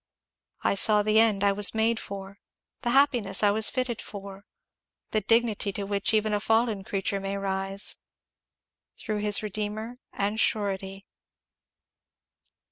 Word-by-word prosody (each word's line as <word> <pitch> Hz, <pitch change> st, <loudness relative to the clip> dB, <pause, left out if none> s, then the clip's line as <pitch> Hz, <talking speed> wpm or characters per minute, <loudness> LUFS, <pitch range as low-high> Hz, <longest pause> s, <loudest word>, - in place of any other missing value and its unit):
I -, -, +2 dB
saw 210 Hz, +1 st, +4 dB
the 215 Hz, +1 st, +3 dB
end 215 Hz, -3 st, +3 dB
I 200 Hz, -, +4 dB
was 205 Hz, +2 st, +2 dB
made 220 Hz, +1 st, +1 dB
for 195 Hz, 0 st, -8 dB, 0.4 s
the 240 Hz, -, -1 dB
happiness 240 Hz, -7 st, +2 dB
I 205 Hz, -, +5 dB
was 220 Hz, +1 st, +3 dB
fitted 255 Hz, -3 st, -2 dB
for 200 Hz, 0 st, -10 dB, 0.6 s
the 215 Hz, -, +1 dB
dignity 225 Hz, -1 st, +1 dB
to 200 Hz, -, -4 dB
which 200 Hz, 0 st, -1 dB
even 215 Hz, -1 st, +1 dB
a 205 Hz, -, +1 dB
fallen 225 Hz, -1 st, +1 dB
creature 195 Hz, 0 st, -2 dB
may 195 Hz, 0 st, -4 dB
rise, 195 Hz, 0 st, 0 dB, 1.0 s
through 215 Hz, -3 st, -3 dB
his 205 Hz, 0 st, +2 dB
dear -, -, -4 dB
Redeemer 215 Hz, +3 st, -5 dB
and 205 Hz, +2 st, -2 dB
surety." 195 Hz, -3 st, -1 dB
205 Hz, 140 wpm, -27 LUFS, 195-220 Hz, 1.0 s, I